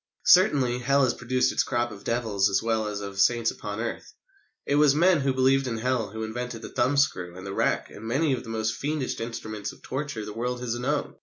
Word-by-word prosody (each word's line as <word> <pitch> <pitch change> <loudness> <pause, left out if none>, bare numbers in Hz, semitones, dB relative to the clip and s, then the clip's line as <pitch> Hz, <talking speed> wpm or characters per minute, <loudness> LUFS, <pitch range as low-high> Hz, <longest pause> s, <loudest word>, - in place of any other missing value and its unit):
Certainly, 135 -9 +5
Hell 140 +3 +3
has 125 - +2
produced 130 +2 0
its - - +1
crop 120 -2 -1
of 100 -2 -11
devils 110 -4 +1
as 95 +1 +1
well 110 -1 0
as 105 -1 -4
of 100 -1 -6
saints 115 +3 +3
upon 105 +1 -6
earth. 115 0 -5 0.5
It - - 0
was 145 -2 +5
men 175 +1 +4
who 135 -1 +1
believed 130 +1 +2
in 115 -2 -2
Hell 120 -2 -1
who 110 +2 -5
invented 115 +1 -5
the - - -6
thumb 130 +4 +1
screw 90 -11 0
and 95 - -9
the 95 - -5
rack, - - 0
and 105 - -11
many 140 +5 +1
of 130 - -2
the 115 - -10
most 110 0 -1
fiendish 145 0 -3
instruments 110 -3 -5
of - - -18
torture 130 -5 -4
the 105 - -7
world 125 +2 -3
has 120 -2 -2
known. 140 +4 -2
120 Hz, 230 wpm, -26 LUFS, 110-135 Hz, 0.5 s, Certainly